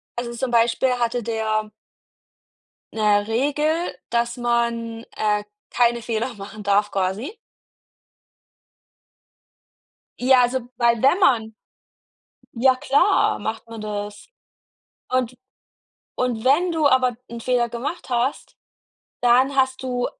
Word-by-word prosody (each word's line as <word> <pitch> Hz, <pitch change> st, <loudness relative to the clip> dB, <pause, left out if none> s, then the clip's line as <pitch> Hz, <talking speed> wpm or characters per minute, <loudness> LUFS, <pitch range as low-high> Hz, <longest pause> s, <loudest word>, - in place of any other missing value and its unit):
also, 240 Hz, 0 st, -4 dB
zum 245 Hz, +1 st, -3 dB
Beispiel 240 Hz, +2 st, +2 dB
hatte 240 Hz, 0 st, -1 dB
der 215 Hz, -1 st, -2 dB, 1.2 s
'ne 210 Hz, -2 st, +2 dB
Regel, 295 Hz, +8 st, 0 dB, 0.2 s
dass 235 Hz, +1 st, 0 dB
man, 235 Hz, -1 st, -1 dB
äh, 210 Hz, -1 st, 0 dB, 0.3 s
keine 235 Hz, -1 st, +2 dB
Fehler 235 Hz, +2 st, -2 dB
machen 210 Hz, +1 st, -9 dB
darf, 205 Hz, +1 st, +2 dB
quasi. 200 Hz, -, -2 dB, 2.8 s
Ja, 255 Hz, 0 st, +5 dB
also, 255 Hz, +2 st, +1 dB, 0.2 s
weil 235 Hz, -1 st, +2 dB
wenn 280 Hz, +8 st, +4 dB
man 225 Hz, -, +2 dB, 1.0 s
Ja 255 Hz, +2 st, +4 dB
klar, 285 Hz, +10 st, +2 dB
macht 225 Hz, +1 st, -5 dB
man 225 Hz, -1 st, -8 dB
das. 205 Hz, -, -6 dB, 0.8 s
Und 255 Hz, -1 st, 0 dB, 0.8 s
und 245 Hz, -2 st, -1 dB
wenn 340 Hz, +7 st, +3 dB
du 310 Hz, -3 st, +3 dB
aber 255 Hz, -3 st, +2 dB
'n 235 Hz, 0 st, -7 dB
Fehler 245 Hz, -1 st, +1 dB
gemacht 255 Hz, +9 st, -5 dB
hast, 245 Hz, +3 st, -2 dB, 0.7 s
dann 255 Hz, +3 st, +4 dB
hast 265 Hz, 0 st, +1 dB
du 250 Hz, -1 st, -1 dB
240 Hz, 110 wpm, -22 LUFS, 225-260 Hz, 2.8 s, Ja